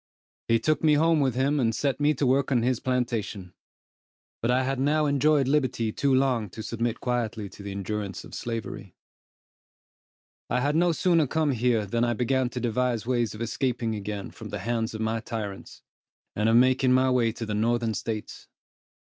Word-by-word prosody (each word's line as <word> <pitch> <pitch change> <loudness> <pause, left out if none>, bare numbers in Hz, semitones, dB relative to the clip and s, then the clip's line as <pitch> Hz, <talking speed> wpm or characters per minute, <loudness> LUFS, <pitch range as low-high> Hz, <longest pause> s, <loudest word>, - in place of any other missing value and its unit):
He 115 - +4
took 155 +8 0
me 155 -1 +5
home 165 +1 +3
with 130 -4 +1
him, 140 +3 +1
and 115 -3 +1
set 140 0 -1
me 150 +1 +3
to 140 - 0
work 135 +2 +2
on 120 -3 +2
his 125 -1 +1
plantation; 115 -7 -2 0.9
but 115 - 0
I 130 +1 +3
had 135 0 -1
now 150 +3 +2
enjoyed 145 -1 +3
liberty 130 -6 +1
too 140 +5 0
long 130 -5 +2
to 110 +5 -8
submit 115 0 -2
quietly 115 -4 -2
to - - -13
the 100 - -6
endurance 100 0 -4
of - - -13
slavery. 115 -2 -5 1.5
I 125 - +1
had 145 +4 0
no 175 +1 +3
sooner 165 -2 +2
come 155 +1 +1
here, 120 -3 +1
than 115 +4 0
I 120 0 +2
began 125 +2 0
to 125 - -5
devise 120 -1 0
ways 120 -3 0
of 105 - -9
escaping 120 -1 -1
again 105 -1 -5
from 110 -2 -10
the 105 - -4
hands 115 -1 -1
of 110 - -5
my 110 +1 0
tyrants, 105 -4 -7 0.5
and 105 +2 +1
of 115 - +4
making 130 +1 +4
my 130 0 +3
way 120 -3 +2
to 115 - -5
the 105 - -3
northern 115 +1 +1
States. 105 +2 -5
120 Hz, 190 wpm, -26 LUFS, 110-135 Hz, 1.5 s, me